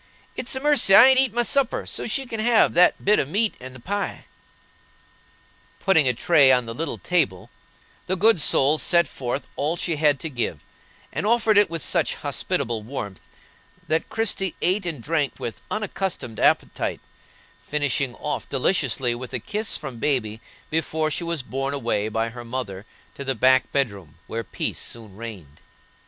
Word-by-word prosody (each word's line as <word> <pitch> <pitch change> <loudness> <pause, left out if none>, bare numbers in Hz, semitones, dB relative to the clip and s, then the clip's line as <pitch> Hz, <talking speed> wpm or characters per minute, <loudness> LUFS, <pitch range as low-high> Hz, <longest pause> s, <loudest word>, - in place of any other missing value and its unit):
It's 255 - -3
a - - -2
mercy 280 -9 +4
I 250 +6 +9
ain't 260 -1 +5
eat 265 -3 +3
my 240 +2 +1
supper, 270 0 0
so - - -4
she 265 +4 -1
can 225 -3 -6
have 230 0 +4
that 180 +1 +4
bit 210 +2 +4
of 135 - -1
meat 210 +5 +1
and 130 0 -10
the - - -11
pie." 200 +10 -4 1.5
Putting 170 -8 +3
a 125 - +3
tray 145 0 +5
on 125 -2 +3
the 115 - -5
little 160 +7 -3
table, 145 - -1 0.6
the 185 - 0
good 210 -2 +4
soul 150 +1 +3
set 170 -1 +3
forth 130 +2 -4
all 155 +4 0
she 165 -2 -1
had 145 -2 +3
to 165 - -3
give, 120 - -3 0.5
and 205 - -2
offered 225 -1 +3
it 205 -3 +5
with 165 -4 -3
such - - +2
hospitable 115 -1 -2
warmth 105 -5 -7 0.7
that 160 +1 0
Christie 195 -5 -1
ate 185 +1 +1
and 150 -9 -5
drank 150 -1 0
with 115 - -6
unaccustomed 190 - -3
appetite, - - +1 0.6
finishing 145 -3 -1
off 150 - -4
deliciously 135 -4 +1
with 125 +2 -8
a - - -1
kiss 210 - -2
from 135 -6 -8
baby 115 -5 -1 0.3
before 155 0 -1
she 170 - -2
was 170 -4 -2
borne 135 +2 -3
away 115 -5 -1
by 115 +1 -1
her 120 +1 -9
mother 115 -5 -6 0.3
to 140 - -7
the 135 -1 -2
back 130 +2 +3
bedroom, 100 - -2
where 115 +1 -4
peace - - -4
soon 110 -4 -9
reigned. 100 -10 -10
145 Hz, 175 wpm, -23 LUFS, 120-190 Hz, 1.5 s, I